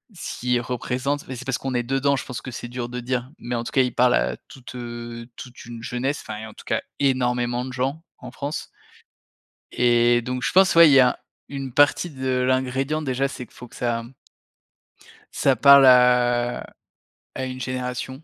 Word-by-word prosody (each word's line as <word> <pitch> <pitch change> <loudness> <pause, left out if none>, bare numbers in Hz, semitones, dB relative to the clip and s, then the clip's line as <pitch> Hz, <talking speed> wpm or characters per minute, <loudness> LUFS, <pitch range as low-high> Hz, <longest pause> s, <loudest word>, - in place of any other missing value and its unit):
s'il 125 -6 -2
représente 130 +4 -3
mais 130 - -6
c'est 130 +2 -9
parce 135 -2 -1
qu'on 135 -1 -4
est 120 - +2
dedans, 135 +3 +1
je 130 - -4
pense 120 -2 -6
que 130 - -8
c'est 120 - -7
dur 120 -1 -5
de 125 0 -5
dire, 125 +2 -3
mais 120 0 -4
en 115 - -2
tout - - -6
cas, 135 - +3
il 125 - -3
parle 125 0 +4
à - - 0
toute, 130 -1 -12
heu, 120 -1 -7
toute 125 -2 -11
une 120 -1 -9
jeunesse 130 +5 -2
enfin, 110 0 -6
en - - -14
tout - - -15
cas 110 0 0 0.2
énormément 125 -2 0
de 130 - -7
gens 135 +6 -2 0.2
en 125 - -9
France 140 +3 -5 1.0
et 120 0 +3
donc, 125 +1 -4
je - - 0
pense, 190 -1 +5
ouais, 165 -2 +9
il - - +5
y 135 - +7
a 125 -1 +3 0.3
une 135 -2 -6
partie 145 +5 +3
de 130 -2 -2
l'ingrédient 130 +4 0
déjà, 135 -1 -1
c'est 130 -2 -8
qu'il - - -26
faut 125 - -11
que - - -17
ça 120 -1 -2
mmh 120 +3 -14 1.2
ça 135 -2 +2
parle 140 0 +7
à 125 -1 +4 0.7
à 130 - -4
une 130 0 -6
génération. 125 0 -4
125 Hz, 200 wpm, -23 LUFS, 120-135 Hz, 1.2 s, ouais